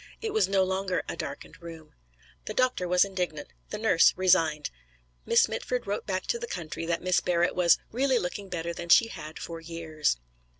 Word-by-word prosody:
It 440 Hz, -2 st, -4 dB
was 440 Hz, -, +3 dB
no 195 Hz, -1 st, +3 dB
longer 190 Hz, 0 st, -1 dB
a -, -, -4 dB
darkened -, -, -7 dB
room. 165 Hz, -2 st, -11 dB, 0.5 s
The 215 Hz, -, -5 dB
doctor 255 Hz, -8 st, +1 dB
was 180 Hz, +2 st, +4 dB
indignant; 180 Hz, -, -4 dB, 0.2 s
the -, -, -4 dB
nurse -, -, +4 dB
resigned. 165 Hz, -5 st, +2 dB, 0.6 s
Miss -, -, +5 dB
Mitford 250 Hz, -1 st, -3 dB
wrote 200 Hz, +1 st, -3 dB
back 185 Hz, -2 st, -2 dB
to 470 Hz, -, -1 dB
the 470 Hz, -, -5 dB
country 165 Hz, -, -5 dB
that 170 Hz, 0 st, -1 dB
Miss 185 Hz, -1 st, +2 dB
Barrett 175 Hz, 0 st, +1 dB
was 175 Hz, -2 st, +4 dB
"really 260 Hz, +2 st, +2 dB
looking 195 Hz, 0 st, -4 dB
better 170 Hz, -1 st, -3 dB
than 170 Hz, 0 st, -7 dB
she 230 Hz, +6 st, +6 dB
had 155 Hz, -4 st, -8 dB
for 165 Hz, -1 st, -7 dB
years." 160 Hz, -, -2 dB
180 Hz, 185 wpm, -28 LUFS, 165-200 Hz, 0.6 s, she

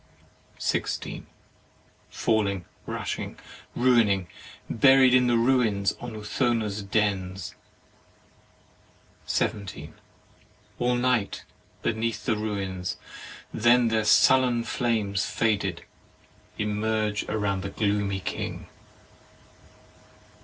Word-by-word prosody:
16. -, -, -2 dB, 0.8 s
Falling, 100 Hz, -5 st, 0 dB, 0.2 s
rushing, -, -, -4 dB, 0.4 s
ruining; 115 Hz, -7 st, +3 dB, 0.4 s
buried 130 Hz, +1 st, +5 dB
in 125 Hz, -1 st, +5 dB
the 120 Hz, -1 st, +3 dB
ruins, 115 Hz, -5 st, +2 dB
on 120 Hz, -2 st, -7 dB
Urthona's 110 Hz, -1 st, -1 dB
dens. 95 Hz, -, -1 dB, 1.7 s
17. 100 Hz, -4 st, -2 dB, 0.9 s
All 125 Hz, 0 st, +2 dB
night 120 Hz, -4 st, 0 dB, 0.4 s
beneath 115 Hz, 0 st, -1 dB
the 110 Hz, -, +2 dB
ruins; 100 Hz, -4 st, -3 dB, 0.6 s
then 120 Hz, +1 st, +4 dB
their 110 Hz, -1 st, +1 dB
sullen 125 Hz, +2 st, +4 dB
flames, 110 Hz, -5 st, -1 dB
faded, 100 Hz, -6 st, 0 dB, 0.7 s
emerge 105 Hz, 0 st, -1 dB
round 100 Hz, -3 st, -1 dB
the 100 Hz, -, -4 dB
gloomy 100 Hz, -1 st, -1 dB
king. -, -, -4 dB
110 Hz, 80 wpm, -26 LUFS, 100-120 Hz, 1.7 s, buried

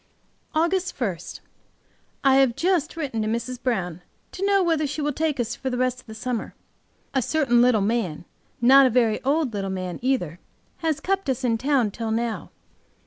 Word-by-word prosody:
AUGUST 350 Hz, +3 st, 0 dB
1 200 Hz, -9 st, -1 dB, 1.1 s
I 270 Hz, -1 st, +5 dB
HAVE 265 Hz, -4 st, +4 dB
just 345 Hz, -3 st, 0 dB
written 270 Hz, -8 st, -2 dB
to 215 Hz, -, -1 dB
Mrs. 235 Hz, +3 st, -3 dB
Brown 180 Hz, -9 st, -2 dB, 0.3 s
to 380 Hz, -, -6 dB
know 395 Hz, -1 st, +3 dB
whether 320 Hz, -3 st, +1 dB
she 295 Hz, +3 st, -5 dB
will 295 Hz, 0 st, 0 dB
take 305 Hz, -1 st, -1 dB
us 240 Hz, 0 st, -1 dB
for 265 Hz, -, -4 dB
the 250 Hz, -, -2 dB
rest 255 Hz, 0 st, 0 dB
of -, -, -33 dB
the 220 Hz, -, -9 dB
summer. 235 Hz, 0 st, -4 dB, 0.6 s
A 265 Hz, -, +2 dB
certain 255 Hz, -4 st, +2 dB
little 245 Hz, -4 st, +4 dB
man, 195 Hz, -7 st, -1 dB, 0.3 s
not 265 Hz, +3 st, +7 dB
a -, -, +2 dB
very 230 Hz, -3 st, +2 dB
old 280 Hz, -2 st, +1 dB
little 195 Hz, -1 st, -2 dB
man 185 Hz, -2 st, -4 dB
either, 205 Hz, -, -1 dB, 0.4 s
has 315 Hz, -2 st, -1 dB
kept 390 Hz, -5 st, -1 dB
us 265 Hz, 0 st, -1 dB
in 230 Hz, -2 st, +1 dB
town 260 Hz, -5 st, +2 dB
till 225 Hz, +2 st, -4 dB
now. 225 Hz, 0 st, -2 dB
255 Hz, 185 wpm, -24 LUFS, 225-295 Hz, 1.1 s, not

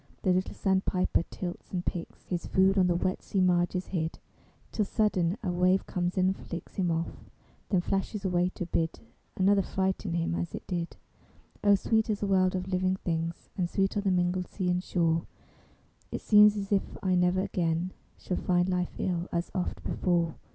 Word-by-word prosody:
The 185 Hz, -, +4 dB
little 185 Hz, +1 st, -1 dB
sandpiper 190 Hz, -2 st, +1 dB
tilts 175 Hz, -2 st, -6 dB
and 180 Hz, -1 st, -3 dB
picks 170 Hz, -2 st, -5 dB
His 175 Hz, -2 st, -3 dB
food, 190 Hz, +1 st, +4 dB
on 180 Hz, -, +4 dB
the 175 Hz, -, +2 dB
wet 185 Hz, +2 st, -1 dB
sea 195 Hz, -, -2 dB
marges 180 Hz, 0 st, +2 dB
hid, 165 Hz, -3 st, -2 dB, 0.5 s
Till 215 Hz, -, +1 dB
sudden 195 Hz, -3 st, +1 dB
a 185 Hz, -, 0 dB
wave 180 Hz, +2 st, +2 dB
comes 175 Hz, 0 st, -2 dB
in 185 Hz, -, +4 dB
and 190 Hz, +1 st, +2 dB
flicks 170 Hz, -2 st, -8 dB
Him 185 Hz, -3 st, +1 dB
off, 165 Hz, 0 st, -3 dB, 0.4 s
then 185 Hz, -4 st, +3 dB
flashes 195 Hz, +2 st, -2 dB
away 180 Hz, -1 st, +2 dB
to 180 Hz, -, -3 dB
bid 165 Hz, -1 st, -1 dB, 0.4 s
Another 195 Hz, +1 st, +4 dB
frighten 190 Hz, -1 st, -1 dB
him 170 Hz, 0 st, 0 dB
as 170 Hz, 0 st, -3 dB
it -, -, -8 dB
did. 175 Hz, -2 st, -3 dB, 0.7 s
O 205 Hz, -1 st, +6 dB
sweet 220 Hz, +3 st, +1 dB
is 210 Hz, -2 st, -1 dB
the -, -, +1 dB
world 185 Hz, -1 st, +3 dB
of 185 Hz, 0 st, -3 dB
living 185 Hz, 0 st, +1 dB
things, 165 Hz, -2 st, -3 dB
And 175 Hz, -2 st, -1 dB
sweet 195 Hz, +2 st, 0 dB
are 205 Hz, -, +1 dB
the 200 Hz, -, 0 dB
mingled 180 Hz, 0 st, +1 dB
sea 180 Hz, -3 st, -1 dB
and 180 Hz, 0 st, 0 dB
shore! 165 Hz, -3 st, +1 dB, 0.8 s
It -, -, -4 dB
seems 210 Hz, 0 st, +6 dB
as 195 Hz, 0 st, -4 dB
if 200 Hz, -1 st, 0 dB
I 185 Hz, -1 st, +2 dB
never 180 Hz, +1 st, +3 dB
again 170 Hz, -1 st, -1 dB, 0.3 s
Shall 180 Hz, -, -3 dB
find 175 Hz, 0 st, +2 dB
life 180 Hz, -1 st, -1 dB
ill 175 Hz, -2 st, -1 dB
as 170 Hz, 0 st, -2 dB
oft 185 Hz, -2 st, -3 dB
before. 170 Hz, -3 st, +1 dB
185 Hz, 190 wpm, -29 LUFS, 175-190 Hz, 0.8 s, O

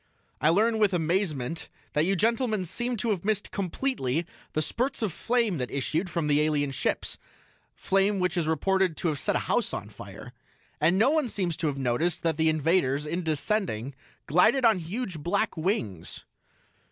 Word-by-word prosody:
I 150 Hz, -, +4 dB
learn 220 Hz, +6 st, +3 dB
with 205 Hz, -4 st, +3 dB
amazement 165 Hz, -4 st, -1 dB, 0.2 s
that 150 Hz, +2 st, +2 dB
you 195 Hz, -, +2 dB
gentlemen 220 Hz, -1 st, +1 dB
seem 240 Hz, +7 st, -2 dB
to 225 Hz, +2 st, 0 dB
have 190 Hz, -5 st, -2 dB
missed 210 Hz, 0 st, 0 dB
completely 175 Hz, -, -1 dB, 0.3 s
the 155 Hz, -, +1 dB
spurts 260 Hz, -, -1 dB
of 200 Hz, -7 st, -1 dB
flame 230 Hz, -, 0 dB
that 125 Hz, -, -2 dB
issued 155 Hz, +7 st, -1 dB
from 165 Hz, -1 st, -1 dB
the 150 Hz, 0 st, +3 dB
alien 150 Hz, -2 st, +1 dB
ships 135 Hz, -, -2 dB, 0.6 s
flame 195 Hz, +1 st, +1 dB
which 180 Hz, 0 st, 0 dB
is 170 Hz, -3 st, 0 dB
reported 185 Hz, +2 st, +1 dB
to 175 Hz, -, 0 dB
have 150 Hz, -3 st, -2 dB
set -, -, 0 dB
a -, -, +3 dB
house -, -, 0 dB
on -, -, -6 dB
fire. -, -, -11 dB, 0.5 s
And 165 Hz, +5 st, +3 dB
no 230 Hz, +7 st, +4 dB
one 305 Hz, -5 st, +1 dB
seems 180 Hz, -6 st, -1 dB
to 160 Hz, -, -1 dB
have 140 Hz, -2 st, -2 dB
noticed 135 Hz, +6 st, 0 dB
that 165 Hz, -2 st, +1 dB
the 160 Hz, 0 st, +3 dB
invaders, 155 Hz, -2 st, +1 dB
in 170 Hz, +4 st, -2 dB
descending, 155 Hz, -, -1 dB, 0.3 s
glided 220 Hz, -, +4 dB
on 220 Hz, -4 st, +5 dB
huge 180 Hz, +1 st, -4 dB
black 200 Hz, +8 st, 0 dB
wings." 155 Hz, -, -2 dB
175 Hz, 175 wpm, -27 LUFS, 155-210 Hz, 0.6 s, on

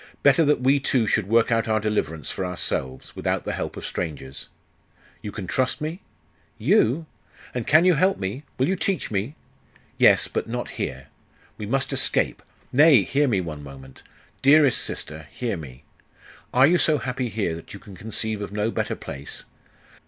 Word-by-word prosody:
'Better 145 Hz, +3 st, +6 dB
that 145 Hz, -3 st, +2 dB
we 135 Hz, +2 st, +4 dB
two 130 Hz, -3 st, +1 dB
should 105 Hz, -2 st, +1 dB
work 115 Hz, +2 st, +3 dB
out 115 Hz, -1 st, +2 dB
our 110 Hz, 0 st, +2 dB
deliverance 105 Hz, -8 st, -2 dB
for -, -, -3 dB
ourselves, 65 Hz, -7 st, -3 dB
without -, -, -1 dB
the -, -, -2 dB
help -, -, -4 dB
of -, -, -6 dB
strangers. 70 Hz, -5 st, -5 dB, 0.7 s
You 105 Hz, -, -6 dB
can 100 Hz, -2 st, -6 dB
trust 130 Hz, +7 st, 0 dB
me?' 160 Hz, +5 st, -4 dB, 0.6 s
'You? 140 Hz, +9 st, +3 dB, 0.5 s
And 125 Hz, -3 st, -3 dB
can 155 Hz, +3 st, +6 dB
you 180 Hz, -, +6 dB
help 185 Hz, +5 st, +2 dB
me? 100 Hz, +8 st, -4 dB, 0.2 s
Will 130 Hz, -, +2 dB
you 190 Hz, -, +1 dB
teach 195 Hz, -, -2 dB
me?' 105 Hz, +9 st, -2 dB, 0.6 s
'Yes, -, -, +6 dB
but -, -, -3 dB
not -, -, -3 dB
here.... -, -, -5 dB, 0.5 s
We 105 Hz, -, -6 dB
must 135 Hz, +4 st, 0 dB
escape -, -, +1 dB, 0.3 s
Nay, 140 Hz, -5 st, +7 dB
hear 145 Hz, +8 st, +1 dB
me, 100 Hz, -7 st, +1 dB
one 80 Hz, -4 st, -6 dB
moment! 65 Hz, -2 st, -12 dB, 0.4 s
dearest 140 Hz, -2 st, +5 dB
sister, 80 Hz, 0 st, -5 dB
hear 120 Hz, -4 st, -2 dB
me! 65 Hz, -6 st, -10 dB, 0.7 s
Are 130 Hz, +2 st, +6 dB
you 170 Hz, +4 st, +4 dB
so 155 Hz, -2 st, +4 dB
happy 125 Hz, -1 st, -3 dB
here 105 Hz, -6 st, -1 dB
that 85 Hz, -, -10 dB
you -, -, -9 dB
can 100 Hz, -2 st, -13 dB
conceive 110 Hz, +1 st, -2 dB
of 100 Hz, -, -5 dB
no 105 Hz, +2 st, -1 dB
better -, -, -2 dB
place? 70 Hz, +1 st, -7 dB
110 Hz, 175 wpm, -24 LUFS, 95-140 Hz, 0.7 s, Nay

